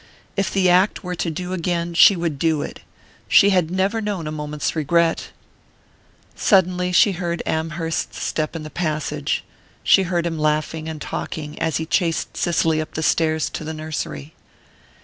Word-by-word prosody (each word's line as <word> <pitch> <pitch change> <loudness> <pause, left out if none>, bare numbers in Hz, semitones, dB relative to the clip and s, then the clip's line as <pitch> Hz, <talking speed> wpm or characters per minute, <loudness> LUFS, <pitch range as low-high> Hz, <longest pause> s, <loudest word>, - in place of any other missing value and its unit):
If 195 -1 0
the 190 -2 +2
act 185 +4 +3
were 180 -1 -4
to 175 -1 -2
do 180 +3 -4
again 170 -1 -1
she 195 +4 +7
would 165 -5 -2
do 160 -2 +1
it - - -7 0.5
she 200 - +6
had 180 -4 +2
never 190 +5 0
known 205 -6 -3
a 150 - -3
moment's 150 0 -3
regret! 165 +2 +1 1.1
Suddenly 180 -2 +2
she 200 +3 +5
heard 170 -2 -3
Amherst's 160 +1 -2
step 155 +1 -2
in 160 - -5
the 155 - -8
passage 150 -3 -2 0.5
heard 175 -2 0
him 165 -2 -2
laughing 155 +1 -1
and 155 -1 -6
talking 150 0 -5
as 160 -2 +1
he 160 - -3
chased 165 +1 0
Cicely 165 -2 +1
up 155 - -8
the 160 - -2
stairs 160 -1 +2
to - - -5
the 160 +1 -5
nursery. 155 -1 -5
165 Hz, 165 wpm, -21 LUFS, 155-180 Hz, 1.1 s, she